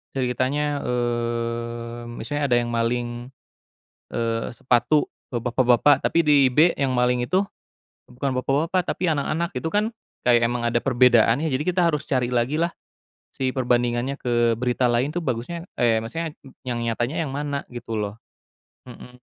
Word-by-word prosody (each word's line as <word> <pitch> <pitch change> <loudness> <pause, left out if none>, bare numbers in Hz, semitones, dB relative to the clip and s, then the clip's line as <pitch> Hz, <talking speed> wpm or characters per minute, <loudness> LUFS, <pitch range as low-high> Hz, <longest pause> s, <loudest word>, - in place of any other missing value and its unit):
ceritanya, 135 +3 0
mmm, 120 0 -3
misalnya 145 +4 -2
ada 120 - +4
yang 120 0 -1
maling, 120 +1 -2 0.8
eee, 115 -1 -2
sepatu, 120 +4 +2 0.2
ba 120 - -1
bapak-bapak, 125 +3 +3
tapi - - +2
di 140 -3 +5
B 155 +7 +4
yang 135 -2 0
maling 125 0 +2
itu 185 +9 +1 0.7
bukan 135 +3 -3
bapak-bapak 155 +8 +1
tapi 180 - -1
anak-anak, 160 +3 0
itu 125 - -3
kan 210 +1 +2 0.4
kayak 120 -1 +5
emang 120 +1 -1
ada 120 - +2
perbedaan 120 -2 +4
ya, 160 - 0
jadi 140 0 -1
kita 180 +1 +1
harus 150 -3 -1
cari 130 -3 0
lagilah 130 +7 +1 0.6
si 130 -1 -2
perbandingannya 120 +1 0
ke 120 -2 +1
berita 125 0 +1
lain 125 +5 0
tuh 175 - 0
bagusnya 130 +5 -3 0.2
eh, 115 -2 +3
maksudnya 160 +7 -4 0.3
yang 120 -1 -2
nyatanya 120 +6 -1
yang 135 - -5
mana 140 0 -3
gitu 120 -1 -7
loh? 105 0 -3 0.7
Mhm. 125 +1 -13
125 Hz, 150 wpm, -23 LUFS, 120-145 Hz, 0.8 s, di